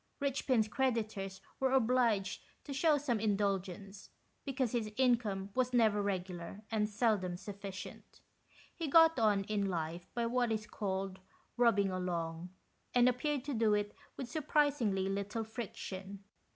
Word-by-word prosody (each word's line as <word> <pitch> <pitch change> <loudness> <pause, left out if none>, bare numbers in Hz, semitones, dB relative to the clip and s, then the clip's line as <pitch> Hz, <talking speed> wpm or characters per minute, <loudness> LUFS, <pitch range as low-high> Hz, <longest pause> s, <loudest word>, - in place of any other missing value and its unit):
Richpin's 260 -5 +1
creditors 215 -5 -1 0.2
were 265 -1 +2
obliged 230 -6 +2 0.2
to 280 - -6
shew 300 +2 +4
some 260 -6 0
indulgence, 200 -2 -2 0.4
because 265 -4 -1
his 225 -3 -1
income 225 -7 +1
was 255 -1 +1
never 220 -4 +4
regular 185 0 -4
and 210 -1 +1
seldom 205 -5 +1
suffi 200 +2 -7
cient. 190 0 -9 0.5
He 330 -2 -4
got 325 -1 +6
on 210 -3 +3
in 200 0 -1
life 170 0 -3
by 235 -1 0
what 240 0 +1
is 215 -1 -1
called 195 -2 -3 0.4
"rubbing 215 -5 +3
along," 175 -2 -3 0.5
and 245 0 +6
appeared 255 +2 0
to 285 0 -3
do 220 -3 +3
it 205 0 -1 0.2
with 265 - -4
surprisingly 270 -9 +1
little 200 +3 -2
friction. 200 -3 -7
215 Hz, 140 wpm, -34 LUFS, 195-250 Hz, 0.5 s, got